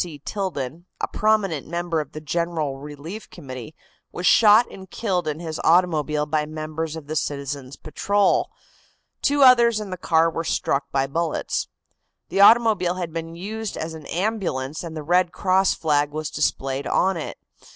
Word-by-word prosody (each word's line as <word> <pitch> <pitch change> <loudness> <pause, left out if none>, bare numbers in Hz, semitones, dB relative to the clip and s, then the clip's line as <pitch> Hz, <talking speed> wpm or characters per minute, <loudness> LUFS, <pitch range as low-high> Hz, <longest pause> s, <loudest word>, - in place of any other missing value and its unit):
C. 165 -4 -8
Tilden, 165 -2 -4
a - - -1
prominent 210 -9 +1
member 170 -1 -1
of 145 - -10
the 155 - -7
General 155 -3 -2
Relief 150 +8 -8
Committee, 135 -2 -9 0.4
was 175 - -5
shot 220 +3 +7
and 190 -1 -11
killed 180 -5 -1
in 155 0 -2
his 160 -2 -5
automobile 155 -4 +3
by 150 0 -1
members 155 +1 -4
of 160 -3 -8
the 155 +2 -5
citizens' 140 -2 -3
patrol. 200 +6 +1 0.7
Two 285 0 +3
others 235 -3 +6
in 210 -3 -6
the 185 - -4
car 165 -2 +3
were 165 - -3
struck 140 -3 0
by 135 0 +1
bullets. 160 +3 -2 0.6
The 195 - +1
automobile 210 -5 +5
had 175 -3 -4
been 165 0 -5
used 215 +4 -5
as 160 0 -4
an 160 -2 -10
ambulance 170 -8 -2
and 165 -2 -6
the 155 - -5
Red 175 +2 +2
Cross 190 0 +2
flag 145 -2 +1
was 155 0 -4
displayed 135 +1 -1
on 190 +1 +2
it. 160 - -5
165 Hz, 165 wpm, -23 LUFS, 150-190 Hz, 0.7 s, shot